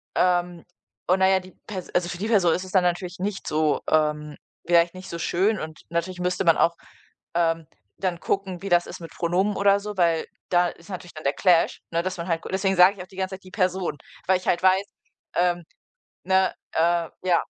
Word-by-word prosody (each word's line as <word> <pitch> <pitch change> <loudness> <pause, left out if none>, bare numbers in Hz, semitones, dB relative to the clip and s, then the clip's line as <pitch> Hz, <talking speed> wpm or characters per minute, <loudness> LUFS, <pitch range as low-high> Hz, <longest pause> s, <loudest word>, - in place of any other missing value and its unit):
ähm, 175 -1 +1 0.4
und 185 +2 +3
na 190 - +5
ja, 190 0 +4
die 185 0 -14
Pers 190 -4 -6
also 180 -1 +2
für 175 - -5
die 210 - -2
Person 190 -7 +4
ist 185 - -2
es 185 - -10
dann 185 -2 +4
natürlich 180 +1 -1
nicht 195 +1 -3
so 155 -1 +1
ähm, 150 -1 +1 0.3
vielleicht 170 0 +4
nicht 185 0 -10
so 170 - -5
schön, 195 +5 +1
und 155 0 -7
natürlich 170 +2 -2
müsste 180 +1 0
man 165 -1 +5
auch, 170 - +3 0.6
ähm, 165 -2 +1 0.3
dann 180 -3 -2
gucken, 190 -3 -2
wie 195 - -5
das 175 -1 +4
ist - - -9
mit 165 -1 -9
Pronomen 185 +5 0
oder 200 0 +4
so, 210 0 -6
weil 170 -2 +2 0.2
da 175 0 +4
ist 170 - -14
natürlich 180 -2 -7
dann 155 - -9
der 140 - +2
Clash, 175 -1 +3
ne? 165 0 +1
Dass 185 0 -2
man 170 +1 -5
halt 165 -1 0
deswegen 190 0 +1
sage 180 +3 +7
ich 180 - -6
auch - - -15
die 185 - -17
ganze 190 0 -2
Zeit, 190 - -16
die 185 - -14
Person, 185 -4 0 0.3
weil 190 0 +4
ich 185 - -11
halt 175 - +1
weiß, 190 +1 +4 0.5
ähm 175 0 +1 0.6
ne? 190 0 +3 0.2
Äh, 170 0 +2
ja. 180 -2 +3
180 Hz, 220 wpm, -24 LUFS, 170-190 Hz, 0.6 s, sage